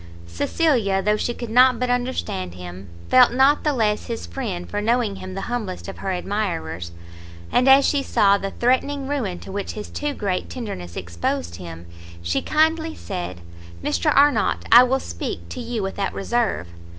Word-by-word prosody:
Cecilia, 200 - +1
though 210 0 +3
she 225 - -1
could 240 -1 -6
not 250 0 +5
but 250 0 0
understand 245 - -2
him, 90 +1 -9 0.2
felt 255 -1 +7
not 270 +4 +4
the 300 - +2
less 215 -6 0
his 230 -1 -4
friend 195 -10 -5
for 205 - -3
knowing 225 -2 +1
him 185 0 -8
the 195 - -3
humblest 215 -6 -4
of 195 - -8
her 195 - -3
admirers; 180 - -3 0.6
and 255 +2 +4
as 270 +1 +7
she 285 - +2
saw 200 -6 +3
the 195 0 -3
threatening 265 +5 0
ruin 245 -11 -2
to - - -9
which 200 +1 -4
his 210 - -7
too 295 -1 -3
great 190 -4 -2
tenderness 90 - -6
exposed 85 0 -3
him, 85 -2 -9 0.4
she 85 0 0
kindly 320 +1 +1
said 175 - -6 0.4
"Mr 85 -3 +1
Arnott, 285 -5 +3
I 240 - +11
will 265 +2 +1
speak, 85 - -5
to 85 - -6
you 230 -4 -3
without 195 +1 -3
reserve. 210 - -1
210 Hz, 175 wpm, -22 LUFS, 175-255 Hz, 0.6 s, I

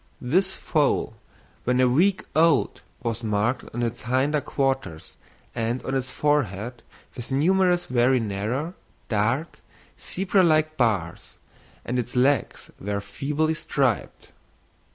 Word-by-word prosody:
This 185 +9 +1
foal, 145 -7 0 0.5
when 125 +1 +1
a 130 - +5
week 180 +10 +2
old, 160 -3 +3 0.2
was 115 -1 -3
marked 110 +3 0
on 120 +1 -3
its 120 0 -3
hinder 135 +5 +1
quarters 135 - -2 0.4
and 115 +2 -2
on 135 - -2
its 130 -1 -1
forehead 120 -6 -1 0.3
with 120 +1 -7
numerous 180 +5 +3
very 125 +1 +3
narrow, 115 - -2 0.4
dark, 115 +9 0 0.4
zebra 190 +1 +1
like 155 -2 +3
bars, 100 - -1 0.5
and 125 +1 -1
its 125 +1 -4
legs 130 -1 +1
were 100 0 -2
feebly 150 +9 -1
striped. 135 -6 -1
130 Hz, 120 wpm, -25 LUFS, 115-155 Hz, 0.5 s, a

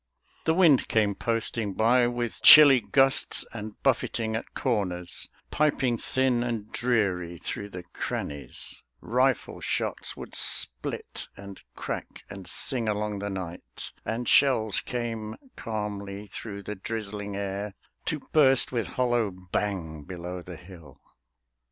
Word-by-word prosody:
The 160 - +3
wind 165 -7 +5
came 105 -2 +2
posting 115 -1 -2
by 120 +2 +4
with 120 -1 -3
chilly 145 -4 +10
gusts 135 +2 +3
And 110 -2 -7
buffeting 115 -4 +1
at 110 - -6
corners, 90 -8 -2 0.2
piping 135 -6 +1
thin 130 -2 +1
And 115 -3 -3
dreary 95 -8 0
through 100 +5 -5
the 90 -2 -8
crannies; 70 -4 -6 0.2
rifle 125 +2 +1
shots - - -1
Would - - -9
split - - -1
and 100 0 -10
crack - - -6
and 95 -3 -9
sing 115 +4 -1
along 105 -1 -1
the 100 +1 -3
night, 90 -3 -6
And 115 +2 -3
shells 110 -7 +4
came 115 -3 -4 0.2
calmly 105 -2 -4
through 100 0 -6
the 105 - -4
drizzling 105 -1 -4
air 100 0 -4 0.3
To 155 -3 -2
burst 135 -4 +5
with 120 -4 -1
hollow 120 -4 +2
bang 90 -4 -3
below 90 0 -6
the 90 -1 -9
hill. 85 -5 -14
105 Hz, 125 wpm, -27 LUFS, 95-120 Hz, 0.3 s, chilly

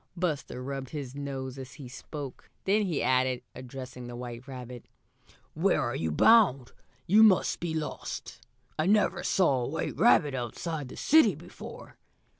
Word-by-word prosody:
Buster 150 -7 -2
rubbed 135 -1 -5
his 140 -5 -6
nose 135 -2 -5
as 130 -1 -8
he 140 -5 -10
spoke. 135 +1 -8
Then 205 +3 +3
he 165 -5 -1
added, 130 0 +2
addressing 125 -1 -8
the 120 - -7
white 120 +1 -7
rabbit: 125 -2 -9 0.7
"Where - - +2
are - - -1
you 80 - -1
bound? 140 - +5 0.3
You 210 +5 +5
must 210 -4 +5
be 165 -2 -3
lost. 155 -1 -5 0.4
I 155 - +2
never 210 +1 +3
saw 140 -9 +2
a - - -2
white 160 +4 -3
rabbit 160 - +5
out 120 -3 -4
of 160 -5 -3
the - - -10
city 275 - +5
before." 170 +4 -11
140 Hz, 160 wpm, -29 LUFS, 125-170 Hz, 0.7 s, bound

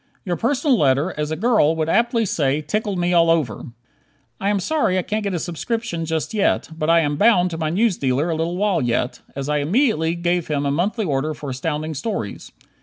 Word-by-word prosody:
Your 180 -2 -1
personal 260 - +1
letter, 140 +5 +2
as 150 0 -2
a 160 - -2
girl 195 -5 +3
would 160 -1 -1
aptly 230 +5 +2
say, 150 -5 0
"tickled 205 +5 -2
me 175 0 +1
all 170 -1 +4
over." 155 -10 0 0.7
I 195 - 0
am 205 -1 +1
sorry 195 - +1
I 185 - 0
can't 215 +3 -2
get 200 -3 -2
a - - 0
subscription 175 +1 -3
just 160 +6 -2
yet, 205 -2 +1
but 155 0 -2
I 165 0 +5
am 145 -2 -1
"bound" 185 -4 +4
to 165 - -5
my 155 -1 -1
newsdealer 165 - +1
a - - 0
little 165 +2 -2
while 200 -3 +1
yet, 120 0 -1 0.2
as 140 0 -4
I 150 0 +1
immediately 165 - +1
gave 175 0 -1
him 145 -2 -1
a 140 - +1
monthly 200 +8 0
order 150 0 -1
for 145 -2 -6
Astounding 155 +4 -3
Stories. 150 - -5
165 Hz, 210 wpm, -21 LUFS, 150-205 Hz, 0.7 s, I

